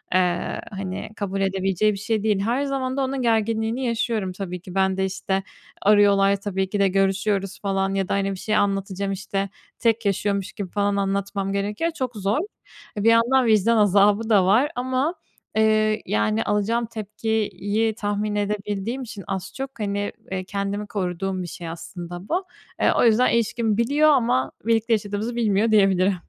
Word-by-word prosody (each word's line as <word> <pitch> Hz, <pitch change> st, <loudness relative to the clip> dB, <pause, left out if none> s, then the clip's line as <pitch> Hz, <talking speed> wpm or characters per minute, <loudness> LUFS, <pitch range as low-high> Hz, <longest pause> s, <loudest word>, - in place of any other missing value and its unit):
ııı, 180 Hz, -1 st, +1 dB
hani, 190 Hz, 0 st, -5 dB
kabul 195 Hz, -1 st, -3 dB
edebileceği 195 Hz, +1 st, +1 dB
bir -, -, -5 dB
şey 215 Hz, 0 st, -1 dB
değil. 210 Hz, -3 st, +2 dB
Her 240 Hz, +7 st, 0 dB
zaman 270 Hz, -1 st, -2 dB
da 270 Hz, -, +1 dB
onun 265 Hz, 0 st, -2 dB
gerginliğini 225 Hz, +2 st, 0 dB
yaşıyorum 225 Hz, -4 st, -1 dB
tabii 180 Hz, -2 st, -6 dB
ki. 180 Hz, 0 st, -10 dB
Ben 190 Hz, 0 st, +2 dB
de 190 Hz, -, +1 dB
işte 190 Hz, 0 st, -2 dB, 0.4 s
arıyorlar 200 Hz, -1 st, +5 dB
tabii 190 Hz, -2 st, -2 dB
ki 205 Hz, +1 st, -2 dB
de 200 Hz, -, +4 dB
görüşüyoruz 195 Hz, +1 st, 0 dB
falan 195 Hz, -1 st, 0 dB
ya 195 Hz, -1 st, 0 dB
da -, -, +1 dB
hani 195 Hz, 0 st, 0 dB
bir 190 Hz, -, -5 dB
şey 215 Hz, 0 st, -1 dB
anlatacağım 195 Hz, 0 st, 0 dB
işte 195 Hz, 0 st, -3 dB, 0.3 s
tek 230 Hz, -2 st, +1 dB
yaşıyormuş 200 Hz, 0 st, 0 dB
gibi 190 Hz, -4 st, -6 dB
falan 205 Hz, -1 st, +1 dB
anlatmam 195 Hz, 0 st, -1 dB
gerekiyor. 210 Hz, +12 st, -1 dB
Çok 255 Hz, -6 st, -4 dB
zor. 200 Hz, +3 st, 0 dB, 0.6 s
E, 205 Hz, -, -1 dB
bir 230 Hz, -, +6 dB
yandan 240 Hz, +3 st, +4 dB
vicdan 220 Hz, +1 st, +4 dB
azabı 205 Hz, +2 st, +4 dB
da 195 Hz, -4 st, +5 dB
var 245 Hz, -, +3 dB
ama, 260 Hz, +7 st, 0 dB, 0.4 s
ııı, 215 Hz, 0 st, +3 dB
yani 105 Hz, +1 st, +1 dB
alacağım 220 Hz, +3 st, 0 dB
tepkiyi 220 Hz, -1 st, -2 dB
tahmin 205 Hz, 0 st, -2 dB
edebildiğim 205 Hz, +3 st, -2 dB
için 205 Hz, -5 st, -8 dB
az 190 Hz, -2 st, -4 dB
çok, 270 Hz, -3 st, -6 dB
hani, 205 Hz, 0 st, -2 dB, 0.2 s
ııı, 185 Hz, 0 st, -2 dB
kendimi 200 Hz, +1 st, -3 dB
koruduğum 185 Hz, -1 st, -2 dB
bir -, -, -6 dB
şey 170 Hz, 0 st, -7 dB
aslında 175 Hz, +2 st, -8 dB
bu. 370 Hz, +3 st, 0 dB, 0.4 s
Iıı, -, -, +5 dB
o -, -, +4 dB
yüzden 235 Hz, +2 st, +4 dB
ilişkimi 225 Hz, -1 st, +1 dB
biliyor 290 Hz, +6 st, +3 dB
ama 230 Hz, -, +2 dB
birlikte 230 Hz, 0 st, +2 dB
yaşadığımızı 210 Hz, +3 st, -2 dB
bilmiyor 220 Hz, -1 st, +2 dB
diyebilirim. 195 Hz, -2 st, +4 dB
205 Hz, 170 wpm, -23 LUFS, 195-225 Hz, 0.6 s, bir